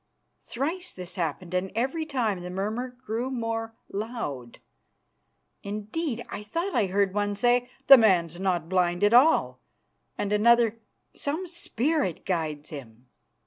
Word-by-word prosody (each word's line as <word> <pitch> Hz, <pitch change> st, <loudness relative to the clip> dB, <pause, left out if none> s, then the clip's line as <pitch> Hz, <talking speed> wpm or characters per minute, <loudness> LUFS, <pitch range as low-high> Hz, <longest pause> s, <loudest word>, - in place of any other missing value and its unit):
Thrice 340 Hz, +9 st, -3 dB
this 180 Hz, -1 st, -6 dB
happened, 175 Hz, 0 st, -3 dB
and 185 Hz, +1 st, -1 dB
every 270 Hz, +7 st, -1 dB
time 225 Hz, -, -1 dB
the 180 Hz, -, -6 dB
murmur 220 Hz, +7 st, -3 dB
grew 235 Hz, +3 st, -2 dB
more 225 Hz, -2 st, -3 dB, 0.2 s
loud. 195 Hz, -, -5 dB, 1.0 s
Indeed, 220 Hz, +6 st, -3 dB
I -, -, -6 dB
thought 335 Hz, -, -3 dB
I 220 Hz, -5 st, +2 dB
heard 195 Hz, 0 st, +1 dB
one 205 Hz, 0 st, 0 dB
say, 245 Hz, +3 st, +2 dB, 0.2 s
"The 275 Hz, -2 st, +10 dB
man's 175 Hz, -6 st, +3 dB
not 180 Hz, -4 st, 0 dB
blind 180 Hz, 0 st, +1 dB
at 205 Hz, +2 st, +4 dB
all," 265 Hz, +7 st, +5 dB, 0.6 s
and 205 Hz, 0 st, -1 dB
another, 230 Hz, +1 st, +4 dB, 0.3 s
"Some 310 Hz, +6 st, -3 dB
spirit 305 Hz, -, -1 dB
guides 155 Hz, -5 st, -2 dB
him." 125 Hz, -4 st, -10 dB
210 Hz, 135 wpm, -27 LUFS, 180-245 Hz, 1.0 s, The